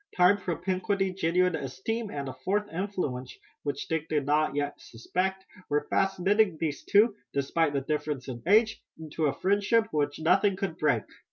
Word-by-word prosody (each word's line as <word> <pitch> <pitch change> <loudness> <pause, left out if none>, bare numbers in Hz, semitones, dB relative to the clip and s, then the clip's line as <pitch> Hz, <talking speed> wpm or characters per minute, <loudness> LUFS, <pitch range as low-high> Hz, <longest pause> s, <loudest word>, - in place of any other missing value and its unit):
Time, 185 +3 +5
propinquity, 185 +2 -1
genuine 180 0 +2
esteem, 180 - -3
and 140 -5 -4
a 130 - -5
fourth 205 +2 0
influence 165 -9 -3 0.2
which 145 -2 -4
Dick 160 -1 -2
did 150 -3 0
not 150 +2 +3
as - - -10
yet 145 0 -2
suspect, 190 +11 -3 0.2
were 150 0 +1
fast 195 -1 +1
knitting 195 -1 +3
these 150 -2 -2
two, 210 +1 +4 0.2
despite 145 +2 +1
the 140 - 0
difference 150 -2 -3
in 120 -3 -6
age, 220 +3 +4 0.2
into 155 0 -2
a 140 - -2
friendship 205 +4 +3
which 145 -1 0
nothing 190 +5 +3
could 190 -3 -3
break. 125 -8 +2
165 Hz, 170 wpm, -28 LUFS, 145-195 Hz, 0.2 s, Time